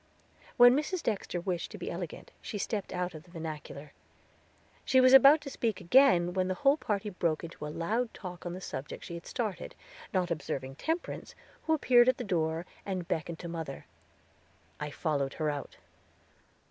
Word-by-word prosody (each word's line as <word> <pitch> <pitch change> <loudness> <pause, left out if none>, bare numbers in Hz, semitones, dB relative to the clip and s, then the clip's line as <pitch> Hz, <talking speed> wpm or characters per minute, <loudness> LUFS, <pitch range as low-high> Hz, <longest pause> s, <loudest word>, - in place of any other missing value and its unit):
When 245 +1 +8
Mrs. 325 +5 -1
Dexter 195 -4 -2
wished 175 -1 -3
to 210 - -9
be 180 - -5
elegant 170 -2 -6
she 210 - -5
stepped 205 0 -3
out 180 -1 -2
of 155 - -9
the 175 - -21
vernacular. 155 -3 -7 0.9
She 260 - +4
was 255 0 +6
about 275 +4 +9
to 280 - -7
speak 225 -6 -1
again 175 -5 +5
when 185 0 +1
the 185 - -1
whole 275 +7 +4
party 210 -5 -2
broke 170 -4 -1
into 160 -2 -7
a - - -5
loud 220 +10 -1
talk 180 -3 -8
on 175 - -4
the 185 - -7
subject 140 -6 -6
she - - -7
had 170 0 -8
started, 215 -7 -4 0.4
not 180 -3 0
observing 135 -4 -4
Temperance, 325 +2 -3 0.3
who 320 - +4
appeared 245 -4 +5
at 255 - +2
the 250 - -4
door, 165 -4 -1 0.2
and 185 -3 -4
beckoned 165 +1 -2
to 175 - -7
mother. 160 -5 -6 0.9
I 150 - -3
followed 145 -3 -1
her 155 -2 0
out. 145 -1 -7
180 Hz, 180 wpm, -30 LUFS, 160-235 Hz, 0.9 s, about